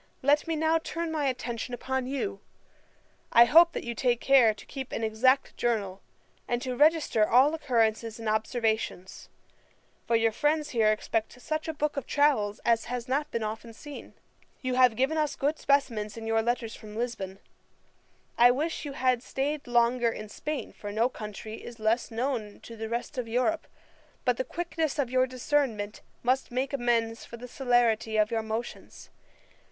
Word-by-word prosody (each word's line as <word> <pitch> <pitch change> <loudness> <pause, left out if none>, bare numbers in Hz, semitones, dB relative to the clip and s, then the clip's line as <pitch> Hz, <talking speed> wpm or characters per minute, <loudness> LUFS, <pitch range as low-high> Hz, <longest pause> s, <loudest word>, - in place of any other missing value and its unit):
Let 290 +4 +3
me 325 - 0
now 320 +1 +2
turn 330 0 -4
my 305 -2 -1
attention 245 -1 -3
upon 260 +1 -2
you. 280 +9 -3 0.9
I 235 - +8
hope 335 +6 +6
you 235 - -3
take 240 0 +1
care 260 -5 +5
to 210 - -11
keep 265 -2 -7
an 225 - -3
exact 255 +5 +2
journal, 205 -5 -1 0.5
and 240 - 0
to 255 -2 -3
register 295 -7 +3
all 265 +6 +5
occurrences 230 -6 0
and 225 -1 -6
observations; 220 -3 -1 0.8
for 235 - +2
your 225 0 +3
friends 295 +5 0
here 220 -3 +3
expect 220 +3 -2
such 310 +4 -3
a - - 0
book 295 0 -1
of 280 - -3
travels 265 -9 +2
as 230 -1 +3
has 245 0 -4
not 290 +4 0
been 230 -6 -2
often 220 +2 -5
seen. 290 +5 -10 0.5
You 255 -1 -1
have 250 -2 +5
given 275 +6 +1
us 300 -1 0
good 295 +3 -1
specimens 230 -7 +1
in 225 - -6
your 225 0 +2
letters 235 -1 -2
from 210 -1 -11
Lisbon. 215 -5 -4 1.0
I 240 +1 +8
wish 300 +5 -1
you 285 - -5
had 255 -2 +1
staid 280 +3 -3
longer 240 0 +3
in 215 -2 -6
Spain, 300 +6 -5
for 205 - -7
no 225 +4 +2
country 215 -1 -7
is 235 - -9
less 220 +2 0
known 230 -3 -3
to 230 - -10
the 220 0 -5
rest 240 +3 -3
of 240 - -3
Europe; 255 +8 0 0.6
but 250 -1 +2
the - - 0
quickness 330 -1 -2
of 265 -4 -1
your 255 0 +3
discernment 250 -5 -1 0.2
must 255 +2 +1
make 260 +3 -2
amends 235 -3 0
for 235 - -10
the 250 +2 -9
celerity 235 -4 +1
of 215 0 +3
your 225 -1 0
motions. 220 +2 -6
245 Hz, 175 wpm, -28 LUFS, 225-275 Hz, 1.0 s, I